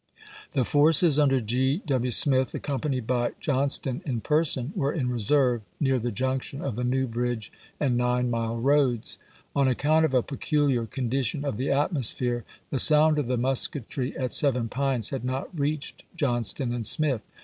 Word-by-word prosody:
The 130 Hz, -5 st, +1 dB
forces 150 Hz, +2 st, +4 dB
under 135 Hz, -3 st, +3 dB
Gr. 125 Hz, +4 st, 0 dB
W. 130 Hz, -4 st, 0 dB
Smith, 130 Hz, +1 st, +3 dB
accompanied 135 Hz, -3 st, -2 dB
by 120 Hz, 0 st, 0 dB
Johnston 135 Hz, -2 st, -1 dB
in 125 Hz, -5 st, -2 dB
person, 150 Hz, -, 0 dB
were 140 Hz, -6 st, 0 dB
in 130 Hz, -6 st, -2 dB
reserve 125 Hz, +1 st, +2 dB, 0.2 s
near 135 Hz, -3 st, +2 dB
the 120 Hz, +1 st, -2 dB
junc 130 Hz, +5 st, -1 dB
tion 135 Hz, -, -8 dB
of 135 Hz, -6 st, -3 dB
the 125 Hz, -, -3 dB
New 130 Hz, +2 st, +1 dB
Bridge 120 Hz, -2 st, -3 dB, 0.3 s
and 130 Hz, -5 st, +1 dB
Nine 125 Hz, 0 st, +1 dB
mile 115 Hz, 0 st, -2 dB
roads. 130 Hz, -2 st, +1 dB, 0.4 s
On 140 Hz, -1 st, +3 dB
account 155 Hz, +5 st, +2 dB
of 135 Hz, -, -1 dB
a 125 Hz, -, +3 dB
peculiar 140 Hz, -4 st, 0 dB
condition 135 Hz, +3 st, -2 dB
of 140 Hz, -7 st, -2 dB
the 130 Hz, +4 st, -2 dB
atmosphere, 130 Hz, -, +1 dB, 0.3 s
the 135 Hz, -, 0 dB
sound 150 Hz, +2 st, +5 dB
of 140 Hz, -, -2 dB
the 125 Hz, 0 st, 0 dB
musketry 130 Hz, 0 st, -2 dB
at 130 Hz, -2 st, -2 dB
Seven 125 Hz, -5 st, +2 dB
Pines 130 Hz, -3 st, -1 dB
had 135 Hz, -3 st, -4 dB
not 130 Hz, +1 st, -3 dB
reached 150 Hz, 0 st, -3 dB, 0.2 s
Johnston 120 Hz, -, -1 dB
and 120 Hz, -1 st, -3 dB
Smith. 135 Hz, 0 st, +1 dB
130 Hz, 170 wpm, -26 LUFS, 120-145 Hz, 0.4 s, sound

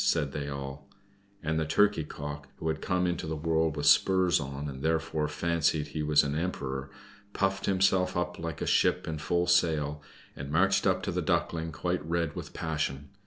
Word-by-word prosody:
said 75 Hz, -4 st, +1 dB
they 70 Hz, 0 st, -4 dB
all. 70 Hz, 0 st, -7 dB, 0.5 s
And 80 Hz, 0 st, 0 dB
the 80 Hz, -, 0 dB
Turkey 105 Hz, 0 st, +3 dB
cock, 75 Hz, -1 st, -7 dB
who 80 Hz, -, -3 dB
had 80 Hz, 0 st, -2 dB
come 90 Hz, -1 st, +1 dB
into 90 Hz, -2 st, -2 dB
the 80 Hz, -, -2 dB
world 80 Hz, 0 st, 0 dB
with 75 Hz, -, -2 dB
spurs 90 Hz, +4 st, +5 dB
on, 70 Hz, 0 st, -5 dB
and 65 Hz, -2 st, -7 dB
therefore 80 Hz, -1 st, 0 dB
fancied 80 Hz, -1 st, 0 dB
he 75 Hz, +1 st, -3 dB
was 75 Hz, 0 st, +4 dB
an 70 Hz, 0 st, -2 dB
emperor, 70 Hz, -5 st, -3 dB, 0.4 s
puffed 95 Hz, 0 st, 0 dB
himself 95 Hz, -1 st, +2 dB
up 90 Hz, 0 st, -2 dB
like 80 Hz, -2 st, -4 dB
a -, -, -1 dB
ship -, -, +2 dB
in 80 Hz, -1 st, -3 dB
full 85 Hz, +3 st, +1 dB
sail, 75 Hz, -4 st, +2 dB, 0.3 s
and 70 Hz, +1 st, -6 dB
marched 95 Hz, +4 st, +3 dB
up -, -, +1 dB
to -, -, -1 dB
the -, -, -1 dB
Duckling 80 Hz, -1 st, 0 dB
quite 90 Hz, +3 st, -2 dB
red 85 Hz, -1 st, -1 dB
with -, -, -6 dB
passion. 70 Hz, -3 st, -3 dB
80 Hz, 190 wpm, -29 LUFS, 75-90 Hz, 0.5 s, spurs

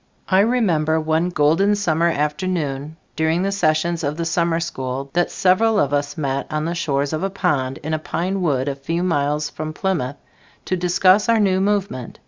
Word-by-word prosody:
I 190 Hz, -, +4 dB
remember 195 Hz, -9 st, +2 dB
on 160 Hz, +3 st, +1 dB
golden 175 Hz, +6 st, +3 dB
summer 170 Hz, -5 st, +1 dB
afternoon 150 Hz, -2 st, -2 dB, 0.2 s
during 160 Hz, +3 st, +1 dB
the 195 Hz, -, 0 dB
sessions 170 Hz, -2 st, 0 dB
of 145 Hz, +1 st, -2 dB
the 170 Hz, -, -2 dB
summer 165 Hz, 0 st, +1 dB
school 135 Hz, -4 st, -4 dB
that 175 Hz, 0 st, +1 dB
several 210 Hz, +4 st, +2 dB
of 145 Hz, -4 st, +1 dB
us 145 Hz, 0 st, -1 dB
met 140 Hz, -2 st, -2 dB
on 155 Hz, 0 st, -2 dB
the 170 Hz, -, -1 dB
shores 145 Hz, -3 st, -1 dB
of 155 Hz, -, -2 dB
a 195 Hz, -, 0 dB
pond 145 Hz, -9 st, -1 dB
in 155 Hz, +1 st, -3 dB
a 155 Hz, -, 0 dB
pine 185 Hz, +5 st, -2 dB
wood 140 Hz, -6 st, 0 dB
a 140 Hz, -, 0 dB
few 165 Hz, +6 st, -3 dB
miles 150 Hz, -3 st, 0 dB
from 155 Hz, 0 st, -5 dB
Plymouth, 155 Hz, -8 st, -2 dB, 0.5 s
to 185 Hz, -, 0 dB
discuss 185 Hz, +4 st, +3 dB
our 230 Hz, -1 st, +4 dB
new 190 Hz, -2 st, +2 dB
movement. 195 Hz, -, -2 dB
165 Hz, 185 wpm, -21 LUFS, 145-185 Hz, 0.5 s, I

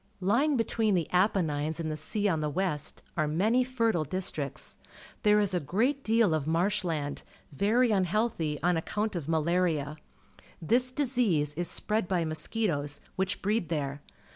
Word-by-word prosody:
Lj 205 Hz, +8 st, +2 dB
ing 300 Hz, -3 st, +1 dB
between 225 Hz, -3 st, +1 dB
the 170 Hz, -4 st, 0 dB
Apennines 160 Hz, -5 st, +1 dB
and 160 Hz, -1 st, -2 dB
the -, -, -2 dB
sea 205 Hz, +7 st, +1 dB
on 165 Hz, -5 st, +1 dB
the 150 Hz, -, -1 dB
west, 150 Hz, -3 st, -1 dB
are 155 Hz, -2 st, +1 dB
many 215 Hz, +11 st, +2 dB
fertile 230 Hz, -9 st, 0 dB
di.stricts. 155 Hz, -3 st, -3 dB, 0.4 s
There 210 Hz, 0 st, +4 dB
is 205 Hz, -3 st, +1 dB
a 180 Hz, -, +2 dB
great 240 Hz, -, 0 dB
deal 225 Hz, -5 st, +3 dB
of 155 Hz, -2 st, -1 dB
marsh 185 Hz, +6 st, +1 dB
land, 150 Hz, -5 st, -3 dB, 0.3 s
very 220 Hz, -, +2 dB
unhealthy 185 Hz, -5 st, 0 dB
on 175 Hz, -1 st, +3 dB
accoimt 210 Hz, +5 st, -2 dB
of 160 Hz, -3 st, -4 dB
malaria. 160 Hz, -2 st, 0 dB, 0.7 s
Tliis 250 Hz, +6 st, +2 dB
disease 230 Hz, -, +1 dB
is 175 Hz, +3 st, -1 dB
spread 215 Hz, -3 st, +2 dB
by 175 Hz, -3 st, 0 dB
mosquitoes, 155 Hz, -2 st, -1 dB, 0.2 s
which 190 Hz, 0 st, -2 dB
breed 205 Hz, -4 st, 0 dB
there. 145 Hz, -3 st, -3 dB
180 Hz, 160 wpm, -29 LUFS, 155-215 Hz, 0.7 s, There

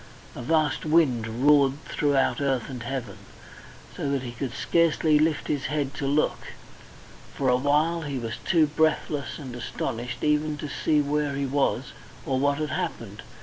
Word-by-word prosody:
A -, -, -6 dB
vast 155 Hz, +1 st, +1 dB
wind 150 Hz, -8 st, +2 dB, 0.2 s
roared 140 Hz, -2 st, +6 dB
throughout 145 Hz, -1 st, +1 dB
earth 135 Hz, -2 st, 0 dB
and 125 Hz, -2 st, -6 dB
heaven, 120 Hz, 0 st, -5 dB, 0.8 s
so 140 Hz, -, -2 dB
that 140 Hz, -2 st, -1 dB
he 120 Hz, -, -5 dB
could 120 Hz, +1 st, -4 dB
scarcely 160 Hz, -1 st, +2 dB
lift 155 Hz, -1 st, +1 dB
his 145 Hz, -3 st, -1 dB
head 145 Hz, -2 st, -1 dB
to 140 Hz, -, -3 dB
look. 145 Hz, +2 st, +1 dB, 1.0 s
For 135 Hz, -2 st, +1 dB
a 125 Hz, -, +5 dB
while 150 Hz, +6 st, +2 dB
he 145 Hz, -3 st, -4 dB
was 115 Hz, -2 st, -4 dB
too 165 Hz, -4 st, +4 dB
breathless 150 Hz, -1 st, 0 dB
and 130 Hz, -4 st, -8 dB
astonished 120 Hz, 0 st, -4 dB
even 150 Hz, 0 st, +1 dB
to 150 Hz, -, -5 dB
see 150 Hz, +1 st, +1 dB
where 145 Hz, 0 st, -1 dB
he 140 Hz, 0 st, -1 dB
was 135 Hz, +1 st, 0 dB, 0.3 s
or 130 Hz, -1 st, 0 dB
what 140 Hz, +1 st, +2 dB
had 155 Hz, -2 st, -2 dB
happened. 110 Hz, -4 st, -4 dB
145 Hz, 165 wpm, -26 LUFS, 130-150 Hz, 1.0 s, roared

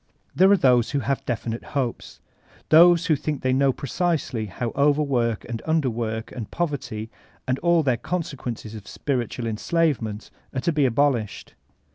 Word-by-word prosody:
There 190 Hz, +1 st, +6 dB
are 200 Hz, -, +6 dB
those 125 Hz, -6 st, +3 dB
who 140 Hz, 0 st, -1 dB
have 135 Hz, +3 st, -1 dB
definite 115 Hz, -1 st, -3 dB
hopes; 125 Hz, -4 st, -3 dB, 0.5 s
those 170 Hz, +2 st, +7 dB
who 160 Hz, -, +3 dB
think 150 Hz, 0 st, -4 dB
diey 130 Hz, 0 st, +2 dB
know 135 Hz, +1 st, +3 dB
precisely 140 Hz, -5 st, -2 dB
how 115 Hz, +5 st, -4 dB
overwork 140 Hz, -5 st, +1 dB
and 115 Hz, -2 st, -5 dB
underwork 120 Hz, -8 st, -1 dB
and 115 Hz, -4 st, -6 dB
poverty, 135 Hz, -9 st, -3 dB, 0.4 s
and 130 Hz, +1 st, 0 dB
aO 170 Hz, -1 st, +3 dB
their 130 Hz, -4 st, +1 dB
consequences 130 Hz, -9 st, -4 dB
of 105 Hz, -2 st, -10 dB
spiritual 125 Hz, -3 st, -3 dB
en* 110 Hz, -1 st, -2 dB
sbvement, 125 Hz, -10 st, -1 dB, 0.2 s
are 130 Hz, -, -1 dB
to 170 Hz, -, +1 dB
be 150 Hz, -3 st, +2 dB
abolished. 125 Hz, -3 st, 0 dB
130 Hz, 155 wpm, -24 LUFS, 115-150 Hz, 0.5 s, those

